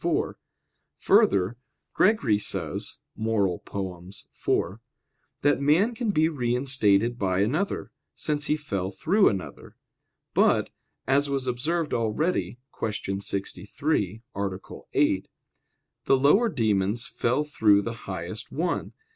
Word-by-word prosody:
4: -, -, 0 dB, 0.6 s
Further, 100 Hz, +4 st, +3 dB, 0.4 s
Gregory 140 Hz, -, +3 dB
says -, -, -2 dB, 0.2 s
(Moral. 105 Hz, -5 st, 0 dB
iv) 95 Hz, +1 st, -4 dB, 0.6 s
that 145 Hz, -1 st, +3 dB
man 170 Hz, +12 st, +3 dB
can 230 Hz, -1 st, -2 dB
be 160 Hz, -5 st, +3 dB
reinstated 120 Hz, -5 st, +1 dB
by 95 Hz, -1 st, +1 dB
another, 155 Hz, -, -1 dB, 0.2 s
since 150 Hz, -1 st, -1 dB
he 150 Hz, -, +2 dB
fell 100 Hz, -11 st, -3 dB
through 195 Hz, -, +3 dB
another. 95 Hz, -3 st, -6 dB, 0.6 s
But, -, -, +3 dB, 0.3 s
as 140 Hz, +2 st, +2 dB
was 135 Hz, -2 st, -1 dB
observed 150 Hz, +6 st, -1 dB
already 120 Hz, +6 st, 0 dB, 0.4 s
(Q. 95 Hz, -1 st, -3 dB
63, 100 Hz, -, -2 dB
A. 95 Hz, -1 st, -3 dB, 0.3 s
8), -, -, +2 dB, 0.8 s
the 135 Hz, -, +4 dB
lower 195 Hz, -, +4 dB
demons 110 Hz, -, +1 dB
fell 125 Hz, +5 st, 0 dB
through 105 Hz, -9 st, +3 dB
the 115 Hz, -, -3 dB, 0.2 s
highest 95 Hz, +4 st, -5 dB
one. 170 Hz, +3 st, -2 dB
120 Hz, 110 wpm, -26 LUFS, 100-150 Hz, 0.8 s, the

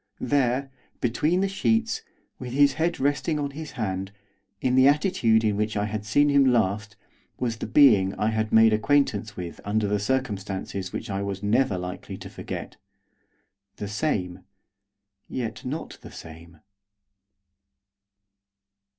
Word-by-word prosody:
There, 135 Hz, -1 st, 0 dB, 0.3 s
between 150 Hz, +9 st, +1 dB
the 195 Hz, -, +2 dB
sheets, 225 Hz, +4 st, 0 dB, 0.4 s
with 125 Hz, -1 st, -6 dB
his 145 Hz, +1 st, +5 dB
head 170 Hz, +1 st, 0 dB
resting 145 Hz, +3 st, 0 dB
on 145 Hz, -1 st, -2 dB
his 155 Hz, +2 st, -8 dB
hand, 95 Hz, -5 st, -3 dB, 0.5 s
in 125 Hz, -, 0 dB
the 130 Hz, +1 st, +6 dB
attitude 140 Hz, -, +3 dB
in 105 Hz, -2 st, +1 dB
which 105 Hz, 0 st, -1 dB
I 105 Hz, -, 0 dB
had 105 Hz, 0 st, -4 dB
seen 145 Hz, +7 st, +4 dB
him 140 Hz, -1 st, +5 dB
last, 110 Hz, -4 st, +1 dB, 0.4 s
was 115 Hz, -3 st, -2 dB
the -, -, -5 dB
being 105 Hz, -6 st, +5 dB
I 105 Hz, -, 0 dB
had 110 Hz, -1 st, -1 dB
made 110 Hz, 0 st, +6 dB
acquaintance 110 Hz, -3 st, +1 dB
with 85 Hz, -2 st, -7 dB
under 105 Hz, 0 st, 0 dB
circumstances 100 Hz, -5 st, -3 dB
which 115 Hz, -, -5 dB
I 100 Hz, 0 st, -2 dB
was 100 Hz, 0 st, -4 dB
never 105 Hz, -1 st, +2 dB
likely 90 Hz, 0 st, -6 dB
to -, -, -10 dB
forget, -, -, -7 dB, 1.0 s
the 105 Hz, -, -5 dB
same, 100 Hz, -, -2 dB, 0.9 s
yet 120 Hz, -4 st, -4 dB
not 145 Hz, +6 st, -5 dB
the -, -, -11 dB
same. 80 Hz, 0 st, -12 dB
110 Hz, 140 wpm, -25 LUFS, 100-140 Hz, 1.0 s, the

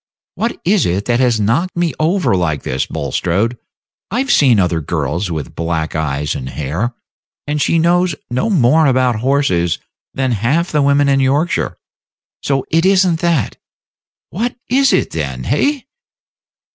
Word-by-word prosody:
What 230 Hz, +2 st, -3 dB
is 195 Hz, 0 st, +3 dB
it 95 Hz, +4 st, -1 dB
that 120 Hz, 0 st, +1 dB
has 120 Hz, -4 st, +2 dB
knocked 140 Hz, -, 0 dB
me 170 Hz, -4 st, 0 dB
over 170 Hz, -, +1 dB
like 80 Hz, -6 st, -1 dB
this, 65 Hz, +1 st, -2 dB
Bulstrode? 100 Hz, +8 st, -1 dB, 0.5 s
I've 260 Hz, +6 st, -1 dB
seen 125 Hz, -7 st, +5 dB
other 85 Hz, -3 st, +1 dB
girls 80 Hz, +4 st, -2 dB
with 80 Hz, -6 st, -5 dB
black 80 Hz, -1 st, -2 dB
eyes 75 Hz, -2 st, -1 dB
and 65 Hz, -1 st, -5 dB
hair, 85 Hz, -, -3 dB, 0.5 s
and 150 Hz, 0 st, -2 dB
she 165 Hz, -, +2 dB
knows 175 Hz, 0 st, +2 dB
no 125 Hz, -, -1 dB
more 155 Hz, -, +4 dB
of 130 Hz, -2 st, +2 dB
horses 110 Hz, -, +1 dB, 0.4 s
than 130 Hz, -1 st, 0 dB
half 135 Hz, -, 0 dB
the 150 Hz, -, +2 dB
women 140 Hz, 0 st, +3 dB
in 135 Hz, -1 st, +3 dB
Yorkshire; 140 Hz, +6 st, 0 dB, 0.6 s
so 135 Hz, -2 st, -1 dB
it 165 Hz, +1 st, +3 dB
is 190 Hz, 0 st, +4 dB
n't 170 Hz, -3 st, 0 dB
that. 170 Hz, -, 0 dB, 0.7 s
What 235 Hz, +6 st, -2 dB, 0.2 s
is 270 Hz, +1 st, +4 dB
it, -, -, +1 dB
then, 65 Hz, -5 st, -4 dB
hey?" 275 Hz, -, 0 dB
130 Hz, 155 wpm, -16 LUFS, -, 0.7 s, seen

